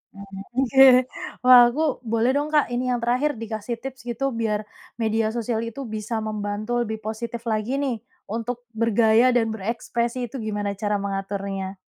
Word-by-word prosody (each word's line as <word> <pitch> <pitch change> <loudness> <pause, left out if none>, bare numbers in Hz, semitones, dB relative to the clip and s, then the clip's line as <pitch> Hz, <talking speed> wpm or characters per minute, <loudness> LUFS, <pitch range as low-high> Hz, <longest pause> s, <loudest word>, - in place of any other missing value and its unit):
Mhm, 195 -1 -9 0.2
oke. 270 +1 +6 0.6
Wah, 250 -1 +9
aku 275 +6 -2 0.3
boleh 230 +2 +3
dong, 290 +1 +1
Kak 295 -5 +2
ini 250 +1 -1
yang 245 - 0
terakhir 255 +4 +1
dikasih 225 +1 -4
tips 265 0 -7
gitu 270 +3 -1
biar 215 -2 -1 0.3
media 225 -1 0
sosial 230 -1 -1
itu 250 +5 -6
bisa 220 -1 -4
membantu 215 +2 -2
lebih 220 -1 -3
positif 230 +2 -5
lagi 220 +3 -1
nih 270 -5 -1 0.3
untuk 235 +2 -4
bergaya 230 +2 +3
dan 225 -2 +2
berekspresi 235 +3 -2
itu - - -10
gimana 205 -2 -2
cara 210 -1 0
mengaturnya? 195 -1 -4
230 Hz, 155 wpm, -24 LUFS, 215-245 Hz, 0.6 s, Wah